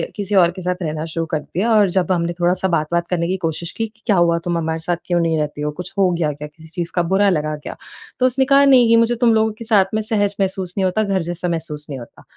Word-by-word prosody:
किसी 205 -1 -2
और 175 -3 +5
के 185 +2 -9
साथ 180 0 -1
रहना 155 -1 -3
शुरू 165 0 -1
कर 155 - 0
दिया 190 +9 -2
और 205 -3 +4
जब 185 +1 0
हमने 170 -1 0
थोड़ा-सा 180 +2 +1
बात-वात 170 0 0
करने 170 -2 0
की 190 +2 -1
कोशिश 165 -1 -3
की 225 0 -3
कि, 220 +1 -27
"क्या 210 - +4
हुआ, 170 -1 +3
तुम 170 0 -2
हमारे 160 0 -2
साथ 170 +2 -2
क्यों 175 -1 +1
नहीं 165 -1 +1
रहती 150 -1 -3
हो? 150 0 -1
कुछ 180 +4 -6
हो 195 -2 +4
गया 165 -3 0
क्या? 150 +1 -8
किसी 160 +2 -16
चीज़ 170 +1 -5
का 175 - +2
बुरा 200 +1 +4
लगा 155 -4 -1
क्या?" - - -6 0.4
तो 255 - +3
उसने 255 +1 +2
कहा, 275 +1 +5
"नहीं, 255 -4 +6
ये 230 - +6
मुझे 230 +1 +3
तुम 235 -2 +5
लोगों 220 0 +2
के 230 - -7
साथ 210 -4 +4
में 220 - +1
सहज 205 -2 0
महसूस 190 -2 -1
नहीं 190 - +2
होता, 185 +4 +1
घर 195 -2 0
जैसा 175 +1 -4
महसूस 160 -3 -4
नहीं 135 -2 -5
होता।" 120 - -13
180 Hz, 275 wpm, -19 LUFS, 165-205 Hz, 0.4 s, नहीं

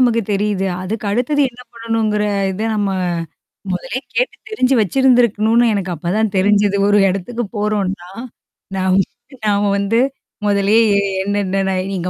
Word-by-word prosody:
நமக்கு 235 -2 +3
தெரியுது. 200 -1 0 0.2
அதுக்கு 210 +3 -4
அடுத்தது 250 +7 0
என்ன 245 +1 -16
பண்ணணுங்கிற 225 -2 -1 0.3
இத 205 +4 -5
நம்ம 205 -2 0 0.8
முதல்லே 200 +7 -3 0.2
கேட்டு - - 0
தெரிஞ்சு 270 -11 +1
வச்சிருந்திருக்கணும்ன்னு 235 0 +3
எனக்கு 190 -3 -2
அப்பதான் 195 +7 -1
தெரிஞ்சது. 205 +1 +3
ஒரு 205 - +4
இடத்துக்கு 210 +6 -2
போறோம்ன்னா, 200 -4 -2 0.7
நாம் 185 0 +2 0.5
நாம 205 0 +2
வந்து 200 +3 0 0.5
முதல்லயே 205 +2 +3
எ - - +4 0.2
என்னன்ன, 195 -1 -1
நா 190 - 0 0.2
நீங்க 180 -1 -2
205 Hz, 130 wpm, -18 LUFS, 195-230 Hz, 0.8 s, ஒரு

